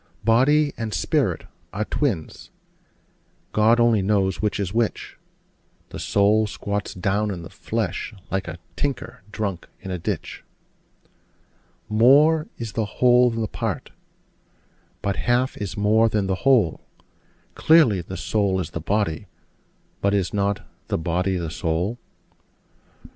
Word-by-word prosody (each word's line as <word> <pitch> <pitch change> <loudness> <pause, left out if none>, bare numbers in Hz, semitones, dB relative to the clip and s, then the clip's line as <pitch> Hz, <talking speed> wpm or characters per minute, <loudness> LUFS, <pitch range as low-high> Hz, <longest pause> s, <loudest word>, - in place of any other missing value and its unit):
Body 145 +6 +4
and 110 -2 -3
spirit - - 0 0.3
are 110 +2 -2
twins: 105 - -2 1.0
God 110 +2 +4
only 120 -3 +4
knows 95 -1 +1
which 105 0 -1
is 95 -1 -2
which: 115 -1 -1 0.7
The - - -7
soul 105 +2 +3
squats 100 0 -4
down 100 +3 0
in 90 -4 -5
the 85 - -10
flesh, 110 -4 -3 0.2
like 95 -2 -1
a 85 0 -6 0.2
tinker 125 0 -3
drunk 100 -4 -4
in 95 - -7
a 90 - -3
ditch. - - -4 1.4
More 145 +8 +5
is 115 -2 -5
the 110 0 -1
whole 125 0 +5
than 115 -1 -2
a - - -1
part: - - -4 1.1
but 100 -2 -1
half 125 +2 +1
is 100 -3 -5
more 110 +2 +3
than 105 -2 0
the 95 +6 -2
whole: 115 -11 +3 0.7
Clearly, 150 - +4
the 95 +2 -7
soul 95 +2 0
is 90 - -4
the 85 - -5
body: 100 0 -1 0.7
but 100 0 +2
is 95 -3 -1
not 100 0 -1 0.2
the - - 0
body 90 +3 0
the 85 -3 -4
soul? 85 +9 -2
105 Hz, 135 wpm, -23 LUFS, 95-115 Hz, 1.4 s, More